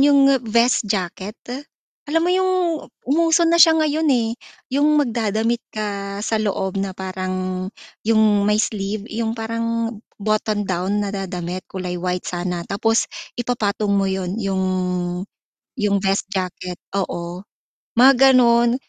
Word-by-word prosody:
yung 280 -1 +6 0.3
vest 235 0 +3
jacket, 195 +2 -3 0.7
alam 325 +2 +2
mo 355 - +2
yung 375 0 +2 0.6
umuso 330 +4 +3
na 335 +1 +4
siya 325 -1 +6
ngayon, 310 0 +1
eh, 235 -4 +2 0.5
yung 300 +2 +4
magda-damit 230 -2 0
ka 200 -2 -4
sa 225 - -1
loob 190 -2 -1
na 195 0 -2
parang 185 0 -3 0.3
yung 215 -2 +3
may 210 0 +3
sleeve, 205 -1 -2
yung 225 0 -3
parang 230 0 -2 0.2
botton 215 0 0
down 185 +3 -1
na 200 - -2
da 195 -1 -3
damit 180 0 -4
kulay 180 -1 -4
white 180 0 -2
sana, 175 -1 -3
tapos 225 +3 +1 0.3
ipa-patong 215 -4 -1
mo 195 -1 +2
yun 190 -1 -2
yung 195 -1 -1 1.1
yung 205 -5 +1
vest 195 0 0
jacket, 185 -2 -4 0.2
oo. 175 -2 -3 0.5
Mga 260 +3 +8 0.2
ganun, 235 -1 +5
210 Hz, 135 wpm, -21 LUFS, 190-235 Hz, 1.1 s, Mga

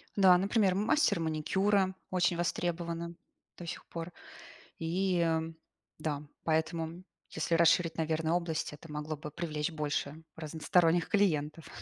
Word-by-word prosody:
Да, 190 -3 +7
например, 195 0 +2
мастер 210 - +3
маникюра 190 +5 +1 0.2
очень 175 -1 +2
востребовано 170 0 -2 0.4
до 175 - -8
сих 165 - -6
пор. 165 +1 -6 0.7
И, 180 +3 0
э, - - +3
м, 160 0 -1 0.4
да. 150 -2 -2 0.2
Поэтому 160 +1 -1 0.3
если 165 +1 0
расширить, 165 0 +4
наверно, 160 +1 +1
область, 170 -4 -2
это 150 +2 -11
могло 150 +1 -4
бы 150 +1 -7
привлечь 155 0 -2
больше 150 0 -2
разносторонних 165 +2 +2
клиентов. 160 -6 +1
165 Hz, 125 wpm, -31 LUFS, 160-180 Hz, 0.7 s, Да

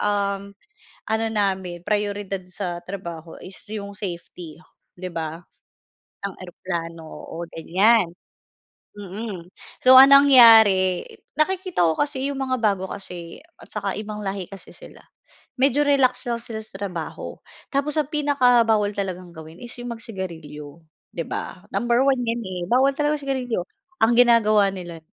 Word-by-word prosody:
uhm, 200 -1 -1 0.6
ano 220 +1 +1
namin, 190 -4 -1
prayoridad 205 -1 -2
sa 180 -2 -4
trabaho, 170 -3 -7
is 185 - -8 0.2
yung 200 -2 -5
safety, 175 -4 -7 0.4
'di 185 0 -6
ba? 160 0 -4 0.9
Ang - - -11
eroplano, 170 -2 -6
oo 165 - -8
ganiyan. 195 +5 +3 0.9
Mm, 200 -2 -7 0.4
so 255 - +7
ang 270 +1 +10
nangyari, 225 -10 +7 0.3
nakikita 365 - +1
ko 160 - +3
kasi 285 -2 -1
'yong 280 - -4
mga 260 -1 -1
bago 195 -4 0
kasi, 175 -4 -8 0.2
at - - -15
tsaka - - -3
ibang 210 0 -6
lahi 195 -1 -3
kasi 195 -1 -12
sila. - - -14 0.6
Medyo 275 +1 +3
relax 275 -3 +2
lang 235 - 0
sila 225 -2 -7
sa 215 - -12
trabaho. 180 -5 -5 0.4
Tapos 285 +2 0
ang 295 -1 -4
pinaka 275 -5 +4
bawal 210 -2 +2
talagang 185 -3 -5
gawin 160 0 -11
is 240 - -7
'yong 245 0 -5
mag-sigarilyo, 165 -7 -8 0.3
'di 165 - -4
ba? 180 - -6
Number 240 +5 +2
1 270 -2 +2
'yan, 230 0 -1
eh, 185 -2 -5
bawal 265 +3 +4
talaga 295 0 +1
ang 290 - -11
sigarilyo. 255 -6 -1 0.4
Ang 230 - +3
ginagawa 215 -4 +5
nila 175 -3 -8
205 Hz, 145 wpm, -23 LUFS, 180-245 Hz, 0.9 s, ang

